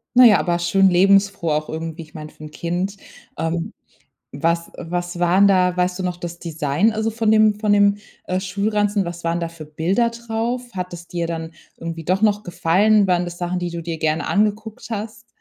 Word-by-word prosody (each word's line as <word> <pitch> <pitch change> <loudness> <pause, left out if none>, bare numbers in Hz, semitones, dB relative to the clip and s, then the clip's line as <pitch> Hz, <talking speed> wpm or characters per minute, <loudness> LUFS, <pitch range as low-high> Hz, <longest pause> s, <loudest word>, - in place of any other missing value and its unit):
Na 250 0 +9
ja, 220 -3 +7
aber 175 -1 0
schön 190 +3 +3
lebensfroh 195 -1 +3
auch 150 0 -1
irgendwie, 160 +1 -5
ich 160 0 -14
meine, 155 -3 -8
für 155 - -15
'n 150 - -9
Kind. 180 +5 -3 0.4
Ähm. 165 +1 -2 0.6
Was, 170 +4 0
äh, - - -8
was 175 0 -3
waren 185 +3 +4
da 180 -2 +3
weißt 180 +1 0
du 185 - -3
noch 180 -1 -2
das 170 -1 -7
Design 165 +5 0
also 220 +1 -1
von 220 -1 +1
dem 215 -1 +4
von 210 -1 +1
dem, 205 0 +4 0.3
äh, 185 - -1
Schulranzen? 205 +1 0
Was 170 0 -7
waren 170 +1 0
da 170 - -2
für 165 -2 -10
Bilder 185 +10 0
drauf? 235 +1 -4
Hat 180 -1 -5
das 175 0 -9
dir 170 -1 -2
dann 165 -1 -5 0.3
irgendwie 165 -1 -6
doch 185 +5 0
noch 210 -1 +2
gefallen? 195 +5 +3
Waren 180 -1 +2
das 175 0 -7
Sachen, 180 0 -2
die 175 -1 -3
du 170 - -5
dir 165 -1 -4
gerne 155 -1 0
angeguckt 215 +3 -1
hast? 215 0 -6
180 Hz, 205 wpm, -21 LUFS, 170-205 Hz, 0.6 s, Na